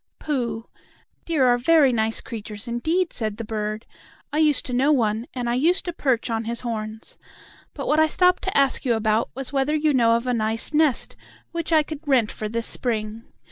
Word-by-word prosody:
"Pooh! 245 -6 -3 0.6
Deer 310 -6 +2
are 245 -1 +4
very 285 -1 +4
nice 220 -1 0
creatures 215 0 -8
indeed," 320 +10 -1
said 215 -3 -3
the 230 - -5
bird. 215 0 -4 0.5
"I 305 - +1
used 300 -3 +3
to 250 - -4
know 270 +4 +3
one, 225 -3 +1
and 245 -2 -3
I 235 - 0
used 320 +9 +2
to 350 - -3
perch 255 -6 0
on 225 0 -2
his 235 0 0
horns. 220 -2 -6 0.6
But - - -5
what 305 - +3
I 315 - +5
stopped 360 +3 +3
to 380 - 0
ask 275 -2 +2
you 245 -4 +2
about 220 +1 +1
was 270 +1 -6
whether 275 +2 +1
you 305 -1 +2
know 230 -3 +4
of 235 +1 -2
a 250 - 0
nice 225 +4 -1
nest 300 -4 +2 0.4
which 335 -1 -4
I 315 -1 +5
could 305 -1 -7
rent 250 -6 +3
for 215 - -5
this 230 +1 -3
spring. 225 -2 -3
245 Hz, 205 wpm, -23 LUFS, 225-300 Hz, 0.6 s, I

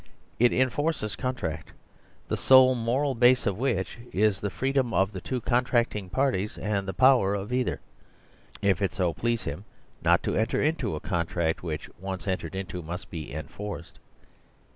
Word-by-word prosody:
It 120 0 +5
enforces 130 -3 0
contract, 125 - -4 0.5
the - - -1
sole 130 -1 +6
moral 130 +4 0
base 125 +1 +4
of 100 -2 -1
which 120 -5 -1
is 105 0 +2
the 100 - -2
freedom 130 - 0
of 95 +1 +2
the 95 -3 -7
two 130 -2 -3
con 125 +2 +2
tracting 115 -6 0
parties, 105 -4 0
and 100 -2 -2
the - - -1
power 125 -6 +5
of 100 +4 -4
either, 125 0 0 0.8
if 100 0 +2
it 100 - 0
so 90 -4 0
please 115 +8 -1
him, 75 +8 -5 0.4
not - - +4
to - - -1
enter 110 +2 +1
into 155 - 0
a - - -4
contract 85 -1 -1
which, 80 -3 -4
once 95 +1 -5
entered 95 -2 -2
into, 95 -2 -4
must 85 +3 -7
be 80 -3 -6
enforced. 85 +4 -7
105 Hz, 165 wpm, -27 LUFS, 95-125 Hz, 0.8 s, sole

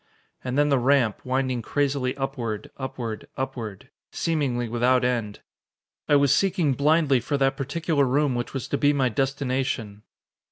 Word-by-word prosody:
And 125 +1 -2
then 145 0 +3
the 140 -2 +3
ramp, 125 -4 +2
winding 130 -1 -1
crazily 135 +1 -1
upward 125 -6 -4
upward 120 -5 -5
upward, 115 -6 -5 0.2
seemingly 135 -7 -1
without 125 +2 +2
end. 115 -5 -2 0.7
I 145 - +6
was 140 -2 +4
seeking 185 -7 +2
blindly 145 -1 +3
for 145 +4 -2
that 135 0 +2
particular 145 +1 0
room 140 +1 +2
which 120 0 -3
was 135 - -4
to 140 - -1
be 145 0 +4
my 135 -3 +2
destination. 130 -4 -2
135 Hz, 150 wpm, -25 LUFS, 120-140 Hz, 0.7 s, I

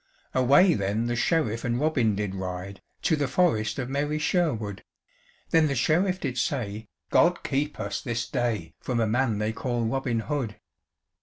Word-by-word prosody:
Away 140 +8 +5
then 105 +2 -1
the 120 0 -1
Sheriff 120 -5 +1
and 120 -1 0
Robin 130 -8 +2
did 100 -1 -2
ride, 95 0 -5 0.2
To 160 - +3
the 145 -2 0
forest 130 -7 +1
of 130 -3 -2
merry 145 +3 -1
Sherwood; 120 - 0 0.7
Then 160 -1 +5
the 140 - -1
Sheriff 180 +8 +2
did 130 -6 -2
say, 110 -6 -2 0.2
"God 175 +1 +4
keep 145 +2 -1
us 100 -1 -3
this 120 0 -2
day 120 -3 -2
From 125 -2 -2
a 115 - +3
man 115 0 +1
they 105 +1 -1
call 120 0 -2
Robin 120 -1 -1
Hood." 130 -6 -3
120 Hz, 165 wpm, -26 LUFS, 110-145 Hz, 0.7 s, Away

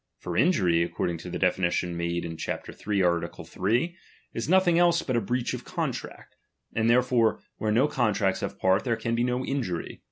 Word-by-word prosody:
For - - -5
injury, 95 - +3
according 85 0 -2
to 90 - -8
the - - -3
de 90 -1 +3
finition 90 -1 -1
made 85 0 -2
in 80 -1 -5
chap. 80 - -4 0.2
iii. 100 -3 +2
art. 85 -1 -1
3, 120 - 0 0.4
is - - -3
nothing 180 -2 +4
else 170 -1 +4
oxit 130 - -1
a 120 - +2
breach 120 +4 -1
of - - -5
contract; - - -5 0.4
and 110 0 +1
therefore 120 -2 +3 0.2
where 110 - -1
no 125 +7 +4
*^ontracts 105 -8 +1
have - - -4
part, 95 0 +2
there 120 -3 +1
can 115 +1 -2
be 120 +1 +1
no 125 +1 -1
injury. 105 -12 -3
110 Hz, 195 wpm, -27 LUFS, 90-125 Hz, 0.4 s, nothing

